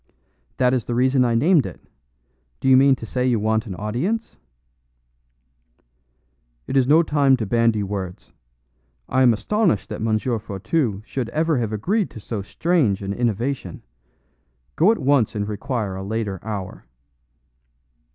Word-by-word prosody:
"That 125 0 +3
is 125 -4 0
the 120 - -3
reason 130 +1 +3
I 120 -2 +1
named 155 +5 +4
it. - - -10 0.8
Do - - -2
you 130 - +7
mean 135 +1 +5
to 115 - -9
say 125 +3 -2
you 120 -3 +2
want 110 +1 0
an 95 - -5
audience?" 125 - -3 2.3
"It - - -4
is 130 -2 +3
no 160 +4 +5
time 140 -4 +3
to 110 - -3
bandy 115 0 +2
words. 95 -2 -6 0.8
I 130 - +1
am 125 -2 +6
astonished 175 - 0
that - - -6
M. 110 -1 +1
Fourtou 110 - -2
should 125 -2 -4
ever 155 +1 0
have 115 -3 -2
agreed 190 - 0
to - - -10
so 105 0 -5
strange 115 - 0
an 100 0 -3
innovation. 120 -3 -2 0.9
Go 180 +7 +5
at 230 - 0
once 135 -7 +2
and 100 -1 -2
require 105 -1 -3
a 95 - -5
later 105 -2 -3
hour." 100 - -6
120 Hz, 150 wpm, -22 LUFS, 105-135 Hz, 2.3 s, you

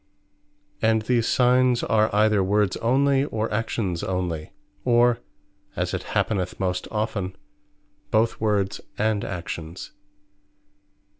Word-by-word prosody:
And 110 -1 +3
these 115 0 +1
Signes 125 -1 +3
are 110 0 +3
either 105 -1 +3
Words 100 0 +2
onely, 135 +3 +3
or 110 -5 -2
Actions 105 -5 -1
onely; 90 -4 -3 0.3
or 120 -1 +4 0.6
(as - - -2
it - - -1 0.2
happeneth 95 -4 -1
most 90 -1 -1
often) 105 -4 -2 0.7
both 110 +1 +1
Words 100 -3 0 0.2
and 110 -1 +1
Actions. 85 -1 -6
110 Hz, 105 wpm, -24 LUFS, 95-115 Hz, 0.7 s, or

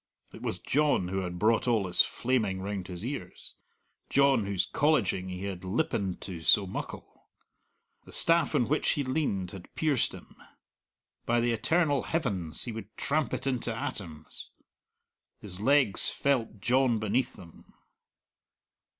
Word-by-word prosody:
It - - -11
was - - -2
John 145 -11 +1
who 95 +1 -1
had 90 -2 -4
brought 110 +6 +2
all 115 -4 +3
this 90 -2 +3
flaming 110 -7 0
round 95 -1 -4
his 90 +3 -6
ears 140 +2 -6 0.6
John 135 -7 +3
whose 100 -2 0
colleging 115 - +1
he 90 +1 -6
had 95 -2 -5
lippened 95 - -1
to 90 -4 -6
so 100 +5 +5
muckle. 95 - -8 0.8
The - - -13
staff 170 0 +3
on 120 - +2
which 150 - +2
he 145 - -1
leaned 130 - -1
had 95 -3 -11
pierced 150 -6 +1
him. - - -12 0.9
By 120 0 +3
the 120 0 +1
eternal 145 +5 +2
heavens 100 - -2
he 120 - -4
would 110 -1 -9
tramp 150 +1 0
it - - -3
into 125 -3 -1
atoms. 95 - -6 0.9
His 95 -3 -7
legs 135 -2 +3
felt 125 -6 0
John 125 -1 +3
beneath 110 +4 0
them. 85 -2 -15
115 Hz, 145 wpm, -29 LUFS, 95-135 Hz, 0.9 s, so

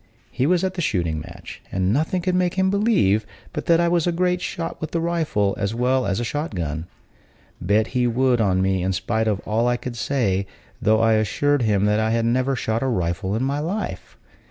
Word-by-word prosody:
He 130 +2 0
was 180 +1 +2
at 190 -1 0
the 180 - -3
shooting 85 - 0
match, - - -10
and 95 +1 +1
nothing 160 +6 0
could 185 0 0
make 180 0 +1
him 190 0 +2
believe 200 - +2 0.3
but - - -5
that 170 -1 +5
I 170 - +3
was 170 -1 +1
a - - +3
great 180 +1 0
shot 165 -1 -4
with 160 +1 -5
a - - +2
rifle 160 -12 0
as 100 +2 -1
well 125 0 +1
as 100 +1 0
a - - -1
shot 145 0 -3
gun. 80 -1 -3 0.7
Bet 105 +5 +2
he 125 -1 +2
would 125 0 +2
on 95 -3 +2
me, 95 -1 +1
in 95 +1 0
spite 110 +4 -1
of 105 -2 0
all 115 +3 0
I 120 0 +2
could 120 0 -6
say, 105 -7 0 0.3
though 110 +1 +3
I 115 0 +4
assured 130 +7 +1
him 105 -3 +2
that 105 +1 +2
I 110 0 +1
had 115 0 +1
never 130 +3 +1
shot 110 -1 -1
a 135 - 0
rifle 95 -3 -1
in 115 - -1
my 140 +2 0
life. 185 +8 -4
120 Hz, 225 wpm, -22 LUFS, 100-160 Hz, 0.7 s, that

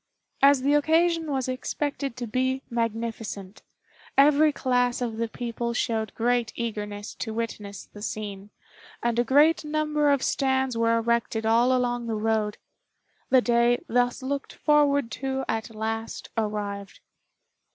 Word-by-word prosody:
As 275 -1 +6
the 285 +2 +3
occasion 325 +2 +2
was 265 -3 -1
expected 275 +1 -3
to 245 - -3
be 260 +3 -1
magnificent, 225 -4 -3 0.6
every 295 +2 +6
class 245 -3 +1
of 235 -3 -3
the 230 0 -1
people 235 0 -4
showed 220 -4 -1
great 240 0 +1
eagerness 210 -3 -4
to 220 -2 -5
witness 210 -3 -5
the 205 - -13
scene, 205 -2 -5 0.5
and 235 0 +1
a - - +4
great 295 +7 +4
number 300 -1 +1
of 280 -2 +2
stands 265 -2 +1
were 230 0 +2
erected 230 -1 0
all 235 +3 +4
along 245 -2 0
the 225 - -1
road. 215 -1 0 0.7
The 260 -1 +6
day 240 0 +3
thus 245 +2 +1
looked 280 +1 -3
forward 285 -5 +2
to 265 0 -2
at 225 +1 -2
last 225 +1 -4
arrived. 205 -2 -3
240 Hz, 140 wpm, -26 LUFS, 225-270 Hz, 0.7 s, As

